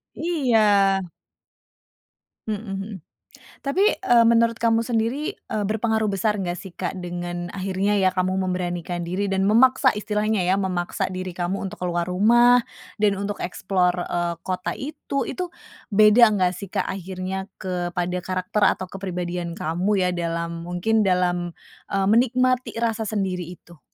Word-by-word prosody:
Iya. 285 -10 +1 1.9
Mhm 215 0 -3
mhm. 195 0 -5 0.7
Tapi, 285 +8 0 0.2
eee, 235 -1 +5
menurut 230 0 +4
kamu 230 0 +2
sendiri, 230 +5 -1
eee, 210 - -4
berpengaruh 220 0 0
besar 205 +1 0
nggak 175 -2 -2
sih, 190 0 -9
Kak, 180 +1 -4
dengan 175 -1 -5
akhirnya 195 +1 0
ya 185 0 +2
kamu 185 +1 0
memberanikan 175 -1 -2
diri 185 +4 -2
dan 195 0 0
memaksa 255 +5 +5
istilahnya 210 0 -1
ya 180 +1 +2
memaksa 185 -1 -2
diri 185 -1 -5
kamu 180 +2 -2
untuk 180 - -8
keluar 175 -1 -1
rumah 240 +6 +5 0.3
dan 205 -2 +1
untuk 200 0 -4
explore, 180 -1 0
eee, 175 0 -1
kota 185 -1 -3
itu. 275 -2 -4
Itu 360 -2 -4 0.4
beda 215 +2 +7
nggak 185 -3 +2
sih, 200 -1 -8
Kak, - - -1
akhirnya 190 0 -4 0.2
kepada 180 -1 -2
karakter 185 +3 -1 0.2
atau 185 - -5
kepribadian 180 -2 -4
kamu 170 +5 -1 0.2
ya, - - +1
dalam 170 0 -3
mungkin 180 +6 +1
dalam, 180 -2 +1 0.4
eee, 195 -1 +1
menikmati 255 +3 +2
rasa 225 -1 0
sendiri 190 -5 -2
itu? 170 -2 -15
190 Hz, 140 wpm, -23 LUFS, 180-220 Hz, 1.9 s, beda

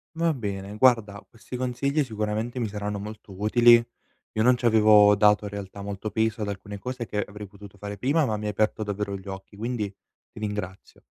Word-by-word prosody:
Va 165 0 +1
bene. 100 -5 -5
Guarda, 110 -5 +3
questi 115 +2 -10
consigli 130 +4 0
sicuramente 110 +1 -3
mi 115 - 0
saranno 105 0 -4
molto 105 0 -9
utili. 120 +3 +6 0.6
Io 110 - +1
non 125 +1 +5
ci 120 - -5
avevo 105 -2 +6
dato 105 0 +4
in 100 - -5
realtà 100 0 -7
molto 100 +1 -4
peso 110 +2 0
ad 105 - -2
alcune 100 0 -6
cose 125 +2 -5
che 105 -1 -2
avrei 105 0 -9
potuto 100 0 -14
fare 100 +1 -6
prima, 145 - +2
ma 110 - -1
mi 105 - -6
hai 105 - 0
aperto 110 +1 0
davvero 105 -1 -3
gli 95 0 -10
occhi, 95 +1 -8
quindi 110 0 -2 0.4
ti - - -11
ringrazio. 105 -3 -6
105 Hz, 200 wpm, -26 LUFS, 100-120 Hz, 0.6 s, utili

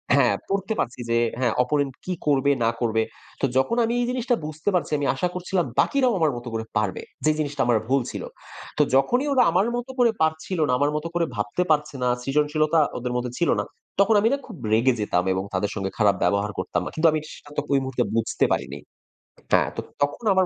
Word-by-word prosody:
হ্যাঁ, - - +4
পড়তে 195 +2 -1
পারছি 125 0 -2
যে 115 - +2 0.2
হ্যাঁ 120 -4 +1
অপোনেন্ট 140 0 0
কি 185 - -1
করবে 140 -1 +3
না 115 - +4
করবে। 110 -2 +1 0.4
তো - - +3
যখন 225 - +2
আমি 230 - -1
এই 245 - +1
জিনিসটা 250 -1 0
বুঝতে 155 +5 -3
পারছি, 180 - 0
আমি 145 - -1
আশা 180 - 0
করছিলাম 180 -1 -1
বাকিরাও 260 -3 +3
আমার 160 -2 +3
মত 120 - -9
করে 110 0 -3
পারবে, 105 -3 -1 0.2
যে 155 - +5
জিনিসটা 145 -2 -1
আমার 120 -1 +3
ভুল 135 +2 +2
ছিল। - - -5 0.5
তো - - +4
যখনই 245 - +2
ওরা 255 -2 +5
আমার 185 +6 +2
মত 245 +1 -4
করে 240 -2 +5
পারছিল 160 +3 0
না, 125 - +1
আমার 145 +1 +2
মতো 150 +2 -2
করে 170 -1 +2
ভাবতে 105 +11 -1
পারছে 150 -1 +1
না, - - +2
সৃজনশীলতা 150 +4 +2 0.2
ওদের 125 0 -3
মধ্যে 125 0 -2
ছিল 170 - +2
না। - - 0 0.4
তখন 200 +3 +5
আমি 215 - +3
না - - +1
খুব 215 -8 -10 0.2
রেগে 120 +4 +4
যেতাম 90 -4 +1
এবং 95 0 -1
তাদের 95 +2 0
সঙ্গে 95 -2 -3
খারাপ 105 -3 +4
ব্যবহার 100 0 +1
করতাম 90 - -1
আ - - -3
কিন্তু 160 +1 +4
আমি 155 - 0
এটা 155 - -11
সেটাতো 145 0 -5
ওই 140 - +4
মুহূর্তে 130 -2 -1
বুঝতে 115 -1 +1
পারিনি। - - -4 0.7
হ্যাঁ, - - +4
তো - - -3 0.2
তখন 145 +10 -2
আমার 190 0 +4
145 Hz, 215 wpm, -24 LUFS, 120-180 Hz, 0.7 s, যে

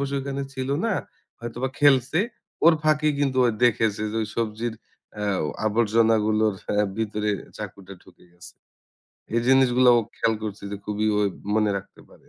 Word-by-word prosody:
বসে 140 0 -2
ওখানে 140 0 -4
ছিল 130 0 -4 0.2
না? 220 - +1 0.5
হয়তোবা 120 +3 -3
খেলছে। 145 +2 +4 0.5
ওর 170 - +8
ফাঁকে 155 0 +2
কিন্তু 135 -2 0
ও - - +3 0.2
দেখেছে 110 -3 +2
যে 115 - -1
ঐ - - -1
সবজির 115 0 -2 0.4
অ্যাও 100 -5 -1 0.2
আবর্জনাগুলোর 110 -1 +2 0.3
আ - - +3
ভিতরে 105 -1 -1 0.3
চাকুটা 100 0 -8
ঢুকে - - -20
গেছে। 90 0 -13 0.8
এই 115 - +3
জিনিসগুলা 130 -1 +5
ও - - +3 0.2
খেয়াল 115 -1 +1
করছে 105 -1 -6
যে - - -3
খুবই 105 +1 -1
ওই 100 - +2 0.3
মনে 105 -1 +2
রাখতে 100 - -15
পারে। - - -21
115 Hz, 155 wpm, -24 LUFS, 105-130 Hz, 0.8 s, ওর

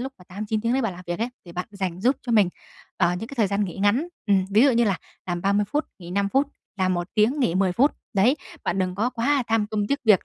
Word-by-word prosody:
lúc 265 +2 -4
mà 180 - -16
8-9 210 +4 -3
tiếng 230 +2 0
đấy 265 - +1
bạn 225 -5 -1
làm 180 +1 -10
việc 175 +2 -3
ấy, 230 +2 0 0.2
thì 170 - -11
bạn 180 +1 -4
dành 190 -3 -4
giúp 255 +6 +3
cho 240 - -2
mình, 210 -5 +5 0.5
ờ, 175 -2 +3
những 225 - -6
cái 275 - -8
thời 220 -4 +3
gian 200 +1 0
nghỉ 175 - -6
ngắn, 205 - +2 0.2
ừm, 195 -3 +3
ví 215 +4 +5
dụ 280 - +6
như 235 -1 +3
là 200 -4 +1 0.3
làm 175 -1 -2
30 200 +2 +2
phút 295 +9 -1
nghỉ 175 -2 -10
5 200 +2 +1
phút, 270 +6 +2 0.3
làm 185 -1 +2
1 175 0 -3
tiếng 235 +7 +3
nghỉ 175 -9 +2
10 185 -1 +2
phút. 270 +10 +4 0.2
Đấy, 235 +9 +4 0.3
bạn 185 - 0
đừng 185 -1 0
có 220 +6 0
quá 260 +3 +1
tham 225 -2 +1
công 210 -1 -1
tiếc 280 - 0
việc, 210 -5 +5
205 Hz, 280 wpm, -24 LUFS, 185-235 Hz, 0.5 s, dụ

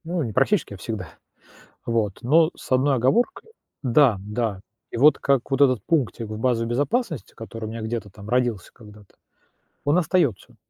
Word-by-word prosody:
Ну, 170 0 -1
не 115 -4 -4
практически, 135 - +1
а - - -8
всегда 95 -2 -5 0.8
вот. 110 -4 0
Но 155 +6 +4
с - - -13
одной 135 +2 +3
оговоркой: 235 - +1 0.3
да, 130 -4 +4
да. 105 0 -3 0.3
И - - -6
вот 150 +5 +6
как 140 -2 +1
вот 135 - 0
этот 130 -7 +3
пунктик 130 -7 0
в 110 0 -6
базе 115 -1 +1
безопасности, 145 - -1
который 115 0 -8
у - - -5
меня 115 +1 -6
где-то 110 -2 -4
там 100 +2 -12
родился 120 -5 0
когда-то, 105 -3 -16 0.7
он 145 +4 +2
остаётся, 165 - 0
120 Hz, 170 wpm, -23 LUFS, 110-145 Hz, 0.8 s, вот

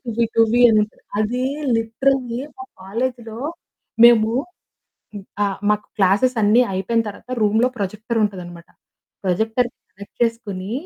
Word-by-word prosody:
టువి 235 -1 0
టూవీ 230 +1 +3
అనుంటది. 215 -1 +1 0.2
అది 235 +4 0 0.3
లిటరల్లి 240 +2 0 0.2
మా 260 - -7 0.2
కాలేజీలో 230 +2 -4 0.7
మేము 225 -2 +6 1.1
ఆ! - - +3 0.2
మాకు 210 0 0
క్లాసెస్ 205 +6 +3
అన్ని 215 +4 +5
అయిపోయిన 210 +5 0
తరువాత 210 +4 -9
రూమ్‌లో 220 +3 +3
ప్రొజెక్టర్ 215 +3 -3
ఉంటది 200 -3 -2
అన్నమాట. 170 -1 -12 0.5
ప్రొజెక్టర్‌కి 220 +6 0 0.2
కనెక్ట్ 200 +1 -14
చేసుకొని, 215 -4 -2
220 Hz, 115 wpm, -20 LUFS, 205-235 Hz, 1.1 s, మేము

